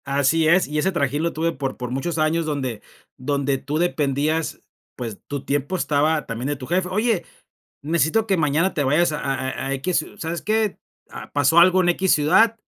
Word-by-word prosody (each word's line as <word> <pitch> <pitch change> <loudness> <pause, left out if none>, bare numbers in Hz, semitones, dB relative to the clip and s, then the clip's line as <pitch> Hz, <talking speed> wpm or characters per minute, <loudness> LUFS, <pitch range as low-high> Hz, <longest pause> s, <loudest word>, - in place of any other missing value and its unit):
Así 140 +3 +2
es, 175 +4 +4
y 150 +1 -2
ese 190 +5 +1
trajín 145 -4 -1
lo 170 +1 0
tuve 165 +1 -1
por 135 -3 -4
por 125 -1 -5
muchos 160 +6 -2
años 160 +1 +1
donde 130 -8 -3 0.4
donde 140 0 -1
tú 145 +3 -3
dependías, 155 -1 0 0.4
pues, 115 -5 -6
tu 140 -1 -5
tiempo 145 +5 -1
estaba 155 -2 +1
también 115 +3 -4
de 145 - -1
tu 130 -2 -8
jefe: 180 +5 0
“Oye, 210 0 0 0.6
necesito 165 +7 +1
que 195 - +2
mañana 160 +4 +1
te 145 - 0
vayas 155 +5 +2
a 150 - -3
a 135 -1 -2
a 130 - -4
a 135 - -1
equis. 155 +4 -1
¿Sabes 165 +1 -4
qué? 215 -1 0 0.3
Ah, - - -10
pasó 145 +3 +4
algo 185 +2 +6
en 175 - +2
equis 185 +2 +2
ciudad. 220 +10 +3
155 Hz, 200 wpm, -22 LUFS, 140-175 Hz, 0.6 s, algo